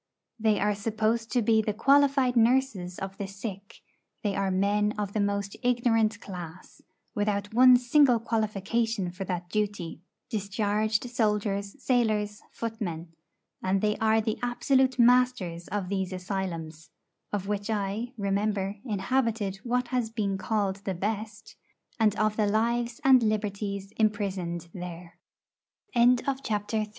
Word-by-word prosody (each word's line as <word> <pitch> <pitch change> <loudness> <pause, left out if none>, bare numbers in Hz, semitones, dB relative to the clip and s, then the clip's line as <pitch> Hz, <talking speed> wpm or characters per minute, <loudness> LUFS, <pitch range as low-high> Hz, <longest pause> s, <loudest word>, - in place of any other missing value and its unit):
They 215 -1 +2
are 210 +1 +2
supposed 220 +2 -1
to 245 -3 +2
be 220 0 +4
the 210 -1 -2
qualified 275 +1 +4
nurses 230 -7 +2
of 195 0 -6
the 200 - -3
sick; 195 0 -8 0.4
they 205 -2 0
are 195 -1 0
men 205 +2 +1
of 205 -1 -3
the 215 - 0
most 200 -1 -1
ignorant 235 -3 +2
class, 175 -3 -9 0.3
without 205 0 -1
one 250 +1 +8
single 245 0 +4
qualification 220 -2 -1
for 190 +2 -6
that 180 -1 -3
duty 205 -6 -2 0.3
discharged 210 +1 -1
soldiers, 210 -4 -1
sailors, 215 -5 0
footmen. 195 -8 -5 0.5
And 190 +1 +1
they 210 +1 +1
are 220 0 +3
the 220 0 -2
absolute 260 +1 +2
masters 240 -9 +3
of 205 -3 -3
these 190 -1 -2
asylums 180 -4 -5 0.4
(of 200 -2 -2
which 205 +1 -2
I, 215 +3 -2
remember, 200 0 -1
inhabited 220 -2 -1
what 245 +3 -1
has 245 -3 0
been 210 -4 -1
called 195 0 -1
the 195 -1 -4
best), 215 +3 -4 0.4
and 215 -2 +3
of 215 -1 +1
the 215 -2 +2
lives 235 +3 0
and 265 -2 +7
liberties 200 -2 -2
imprisoned 195 -6 -1
there. 175 -1 -8 0.8
IV. 240 +1 +4
My 275 - +2
first 270 +1 -9
acquaint 215 +1 -1
210 Hz, 140 wpm, -28 LUFS, 195-230 Hz, 0.8 s, one